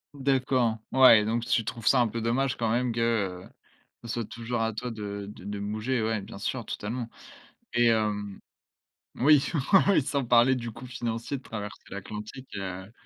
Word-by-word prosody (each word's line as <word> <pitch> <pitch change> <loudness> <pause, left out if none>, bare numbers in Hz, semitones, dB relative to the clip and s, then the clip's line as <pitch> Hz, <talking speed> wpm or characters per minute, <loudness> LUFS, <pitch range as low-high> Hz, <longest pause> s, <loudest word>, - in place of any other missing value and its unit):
D'accord. 130 -4 +1
Ouais, 125 -5 +7
donc 115 +2 -1
tu 115 -1 +2
trouves 115 +1 -6
ça 130 - +5
un 120 - +3
peu 115 - -4
dommage 125 +4 0
quand 115 -2 0
même, 125 +1 +1
que, 115 - -3 0.4
heu, - - -14 0.5
ce - - -8
soit 115 0 -2
toujours 115 +2 -4
à 115 0 0
toi 125 +4 -4
de 100 -3 -6
de - - -13
de 105 0 -5
bouger, 110 +5 -1
ouais, 110 0 0
bien 100 - -10
sûr 120 +3 -3
totalement 115 +4 -4 0.7
et 120 0 +4
hem 105 -3 0 0.8
oui, 145 +2 +5 0.3
ah 195 - +7
oui 155 - +4
sans 140 0 -1
parler 120 +2 +5
du 120 -2 -3
coût 125 - -10
financier 120 +1 -3
de 130 - -12
traverser 105 -4 -7
l'atlantique, 105 +6 -8
heu 95 +1 -6
115 Hz, 185 wpm, -27 LUFS, 105-125 Hz, 0.8 s, Ouais